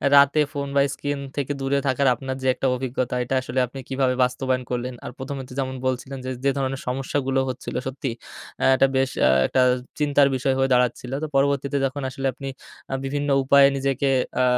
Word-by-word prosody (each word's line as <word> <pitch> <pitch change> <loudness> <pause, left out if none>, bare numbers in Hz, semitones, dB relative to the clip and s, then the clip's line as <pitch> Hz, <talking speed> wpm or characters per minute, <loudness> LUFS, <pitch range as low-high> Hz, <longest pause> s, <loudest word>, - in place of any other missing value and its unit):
"রাতে 140 +2 +6
ফোন 140 -1 -3
বা 140 - +5
স্ক্রিন 145 0 -3 0.2
থেকে 145 -1 -2
দূরে 135 +1 +1
থাকার 135 +1 +2
আপনার 130 -1 -5
যে 130 - -1
একটা 135 - -1
অভিজ্ঞতা, 125 -1 -2
এটা 130 +2 -2
আসলে 130 0 -2
আপনি 135 +2 -9
কিভাবে 130 -1 +1
বাস্তবায়ন 130 0 0
করলেন। 125 +1 -2
আর - - -5
প্রথমে 135 0 -5
তো - - -9
যেমন 130 -1 -2
বলছিলেন 130 +1 -3
যে, - - -3 0.2
যে 140 - +4
ধরনের 135 0 -2
সমস্যাগুলো 135 +1 -1
হচ্ছিল।" 125 - -6
সত্যি, 130 -1 -3 0.5
আ - - +4
এটা 135 - +4
বেশ 130 0 +2 0.2
আ - - +5 0.2
একটা 130 - +2 0.4
চিন্তার 145 -1 +4
বিষয় 130 +1 +1
হয়ে 135 - +2
দাঁড়াচ্ছিল। 125 0 +1
তো - - -1
পরবর্তীতে 140 0 +1
যখন 140 +2 -3
আসলে 135 +1 -3
আপনি 135 +2 -8 0.4
আ - - -2
বিভিন্ন 145 +1 -2
উপায়ে 140 +1 +6
নিজেকে 135 0 0 0.3
আ - - +4
135 Hz, 195 wpm, -23 LUFS, 130-140 Hz, 0.5 s, রাতে